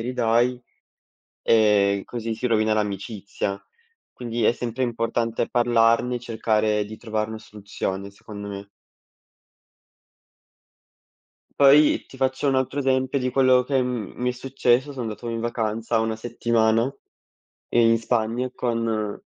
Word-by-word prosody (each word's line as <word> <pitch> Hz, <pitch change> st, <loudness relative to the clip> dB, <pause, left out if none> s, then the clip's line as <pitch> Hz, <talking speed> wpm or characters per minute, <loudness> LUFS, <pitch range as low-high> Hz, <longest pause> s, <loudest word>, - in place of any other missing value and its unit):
ridai", 120 Hz, +1 st, +1 dB, 0.8 s
e 105 Hz, -3 st, +3 dB
così 115 Hz, -2 st, -4 dB
si 120 Hz, +3 st, -3 dB
rovina 110 Hz, -2 st, +2 dB
l'amicizia. 100 Hz, -1 st, -3 dB, 0.5 s
Quindi 120 Hz, -2 st, -3 dB
è -, -, +5 dB
sempre 120 Hz, +1 st, -4 dB
importante 115 Hz, -1 st, -1 dB
parlarne 120 Hz, 0 st, +2 dB
e -, -, -4 dB
cercare 110 Hz, -2 st, 0 dB
di 110 Hz, +1 st, -10 dB
trovar 110 Hz, -1 st, -3 dB
na 110 Hz, -, -6 dB
soluzione, 100 Hz, -2 st, -5 dB
secondo 100 Hz, 0 st, -9 dB
me. 100 Hz, 0 st, -7 dB, 2.9 s
Poi 145 Hz, +2 st, +5 dB
ti -, -, -14 dB
faccio 130 Hz, +2 st, 0 dB
un 135 Hz, -, +2 dB
altro 130 Hz, +2 st, -1 dB
esempio 130 Hz, 0 st, +1 dB
di 125 Hz, -1 st, -1 dB
quello 130 Hz, -1 st, +4 dB
che 135 Hz, 0 st, +1 dB
m 125 Hz, -5 st, -3 dB
mi 125 Hz, 0 st, 0 dB
è -, -, -3 dB
successo. 130 Hz, +1 st, +1 dB
Sono 130 Hz, -, -5 dB
andato 110 Hz, +1 st, -5 dB
in 115 Hz, 0 st, -3 dB
vacanza 115 Hz, 0 st, -1 dB
1 110 Hz, 0 st, -1 dB
settimana, 115 Hz, +1 st, +1 dB, 0.8 s
in 115 Hz, -1 st, +4 dB
Spagna 115 Hz, +2 st, -1 dB
con 115 Hz, -3 st, -2 dB
115 Hz, 125 wpm, -24 LUFS, 110-125 Hz, 2.9 s, è